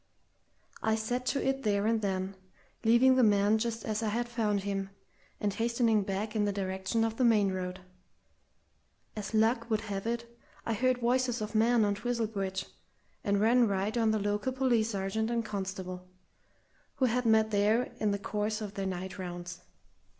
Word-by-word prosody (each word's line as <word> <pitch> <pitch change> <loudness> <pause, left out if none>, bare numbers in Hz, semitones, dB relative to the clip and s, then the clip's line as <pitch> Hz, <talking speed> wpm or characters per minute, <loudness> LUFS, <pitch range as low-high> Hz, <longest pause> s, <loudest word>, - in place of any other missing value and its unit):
I 220 0 +2
set 245 +3 -2
to 275 0 0
it 270 0 0
there 205 -4 +1
and 225 0 +2
then, 190 -1 -2 0.5
leaving 240 +3 +5
the 255 - +5
man 205 0 +4
just 230 -1 -3
as 215 0 -1
I 220 - -1
had 240 +3 -1
found 215 -4 0
him, 195 -1 -3 0.5
and 205 -1 0
hastening 230 0 +2
back 200 +3 -3
in 210 -1 +2
the 205 - +1
direction 190 +3 -1
of 225 0 -1
the 255 - +1
main 210 -5 +4
road. 185 0 -4 1.3
As 210 +1 -4
luck 230 +2 +2
would 220 -1 +1
have 200 -1 -4
it, 235 0 -2 0.4
I 230 - 0
heard 255 +3 +2
voices 245 0 +1
of 215 0 -4
men 225 0 +4
on 205 - +1
Twizel 235 +2 -1
Bridge, 195 -3 -3 0.6
and 200 0 +1
ran 235 +3 +4
right 200 +2 -1
on 225 -2 +2
the 215 - +2
local 205 +4 -1
police 245 -4 +2
sergeant 205 +2 -1
and 235 -1 0
a - - -9
constable, 190 -2 -5 0.9
who 260 - +2
had 250 0 +1
met 220 0 +4
there 215 +4 +2
in 215 - +1
the 200 - 0
course 210 +1 -2
of 210 -2 -6
their 195 -1 -3
night 185 0 -5
rounds. 175 -1 -6
215 Hz, 180 wpm, -30 LUFS, 200-235 Hz, 1.3 s, leaving